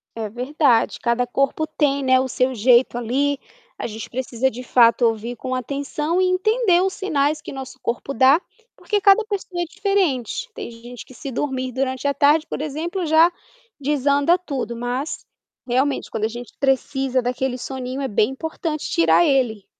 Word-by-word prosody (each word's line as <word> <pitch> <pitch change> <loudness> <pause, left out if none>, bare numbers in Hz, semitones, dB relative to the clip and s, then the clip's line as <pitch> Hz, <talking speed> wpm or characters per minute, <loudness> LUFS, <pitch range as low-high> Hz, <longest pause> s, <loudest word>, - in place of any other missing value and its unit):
É 220 -1 -3
verdade 250 +1 +1
cada 235 +1 +1
corpo 275 +5 0
tem, 280 -3 0
né, 260 0 +4
o 260 - 0
seu 255 +1 0
jeito 240 +2 +3
ali, 270 +4 0 0.4
a - - -4
gente 220 0 -7
precisa 260 +1 -1
de 245 +3 -8
fato 240 -1 +4
ouvir 230 +1 0
com 255 +2 -3
atenção 285 +6 -2
e - - +3
entender 370 0 +2
os 385 - +1
sinais 300 -6 0
que - - -8
nosso 265 -1 -8
corpo 245 +4 -3
dá, 270 +6 +5 0.3
porque 415 -1 -1
cada 400 +3 +5
pessoa 390 -4 -4
é - - +1
diferente, 395 - 0
tem - - -7
gente 235 +1 -11
que - - -15
se 270 +2 -7
dormir 260 -1 -2
durante 260 +2 -1
a - - 0
tarde 300 +3 +3
por - - -5
exemplo 335 +5 -3
já, 320 +3 +5 0.5
desanda 285 +3 +2
tudo, 270 -9 -4
mas 245 +5 -4 0.4
realmente 265 +3 0
quando 220 -1 -1
a - - +2
gente 240 +1 -8
precisa 270 -1 +1
daquele 250 +1 -2
soninho 260 +1 -5
é 270 - -1
bem 210 +4 +2
importante 315 +1 -4
tirar 165 +1 +4
ele. 240 -7 +1
265 Hz, 175 wpm, -21 LUFS, 245-305 Hz, 0.5 s, dá